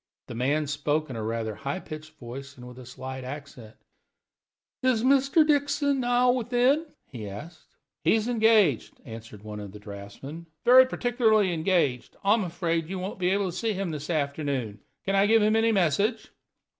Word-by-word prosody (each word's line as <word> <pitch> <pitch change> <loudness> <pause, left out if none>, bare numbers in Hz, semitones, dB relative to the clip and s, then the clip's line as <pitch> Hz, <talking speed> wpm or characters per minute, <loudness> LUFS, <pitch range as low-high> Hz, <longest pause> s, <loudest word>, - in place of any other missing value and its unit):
The - - -8
man 140 +6 0
spoke 145 +1 -1
in - - -6
a 110 - -4
rather 110 0 -2
high 140 - -4
pitched 155 -2 -9
voice 135 +1 -9
and 125 0 -11
with 125 +1 -11
a 125 - -11
slight 130 +1 -7
accent. 130 -5 -9 1.1
"Is 255 -3 +2
Mr. 275 +4 +4
Dixon 285 -1 +1
now 245 0 +3
within?" 250 +5 +2 0.2
he 110 -6 -8
asked. 155 - -11 0.3
"He - - +4
is 220 0 0
engaged," 220 - +3
answered 110 -2 -10
one 105 -1 -7
of 100 -2 -8
the 105 - -10
draughtsmen; 105 +11 -9 0.2
"very 255 +1 +8
particularly 220 -7 +2
engaged. 160 -7 0
I 200 +1 +5
am 220 -2 +1
afraid 165 -2 -2
you 190 - -3
won't 185 +1 -5
be 180 0 +1
able 195 -1 0
to - - -10
see 225 +3 -1
him 190 -3 -3
this 150 0 -6
afternoon. 140 -8 -2 0.3
Can 195 - 0
I 195 +1 +4
give 225 0 +4
him 215 +1 +3
any 225 0 +3
message?" 200 - +1
165 Hz, 180 wpm, -27 LUFS, -, 1.1 s, very